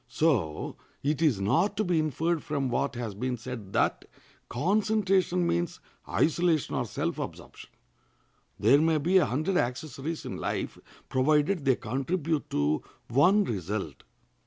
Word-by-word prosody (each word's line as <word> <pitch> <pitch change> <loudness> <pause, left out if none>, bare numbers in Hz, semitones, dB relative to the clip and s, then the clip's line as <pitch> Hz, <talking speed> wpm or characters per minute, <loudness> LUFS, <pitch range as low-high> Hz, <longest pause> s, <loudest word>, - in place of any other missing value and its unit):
So 115 - 0 0.3
it 150 +2 0
is 145 -11 +3
not 170 - +1
to 215 - +2
be 175 -4 +1
inferred 160 +2 0
from 140 -3 -2
what 135 +2 -1
has 120 -4 -4
been 125 +5 -2
said 115 -4 -7
that - - +1 0.4
concentration 190 - +1
means 175 +1 -1 0.3
isolation 165 -1 +1
or - - 0
self - - -3
absorption. - - -8 0.9
There 140 +2 +5
may 160 0 +3
be 175 +6 +3
a - - +2
hundred 155 +9 0
accessories 140 +4 -3
in - - -5
life, - - -3 0.3
provided 150 +5 +2
they 130 -2 +4
contribute 150 +4 -2
to 75 +1 +1 0.3
one 180 - +5
result. 100 - -4
150 Hz, 135 wpm, -28 LUFS, 125-175 Hz, 0.9 s, There